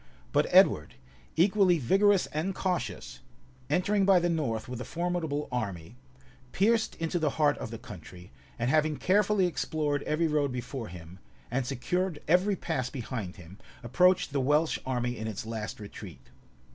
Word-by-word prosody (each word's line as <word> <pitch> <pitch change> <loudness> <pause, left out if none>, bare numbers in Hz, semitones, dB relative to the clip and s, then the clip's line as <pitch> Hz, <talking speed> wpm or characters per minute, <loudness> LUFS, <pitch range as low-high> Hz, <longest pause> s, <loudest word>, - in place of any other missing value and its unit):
But - - +2
Edward, - - +4 0.4
equally 185 +1 +4
vigorous 195 - +3
and 165 +6 -2
cautious, 185 -2 -3 0.5
entering 195 +6 +2
by 195 -1 +6
the 175 0 0
north 130 -8 -2
with 125 0 -6
a - - -3
formidable 170 -3 -2
army, 100 -5 -4 0.6
pierced 220 +3 +2
into 165 +1 -2
the 155 -2 +1
heart 150 -2 +3
of - - -5
the 115 - -6
country; 90 -5 -12 0.3
and 120 +1 0
having 155 -1 +2
carefully 200 0 +3
explored 150 -4 -1
every 155 +3 0
road 150 -3 +1
before 125 -1 -5
him, 90 +1 -11 0.3
and 125 0 -1
secured 165 +6 -1
every 180 +5 +3
pass 155 -8 -2
behind 115 -7 -5
him, 90 +2 -13 0.2
approached 180 +6 +3
the 140 - +1
Welsh 150 +4 +2
army 125 -1 -1
in 110 - -4
its 110 -1 -5
last 110 -1 -5
retreat. 65 -10 -11
145 Hz, 155 wpm, -29 LUFS, 115-180 Hz, 0.6 s, by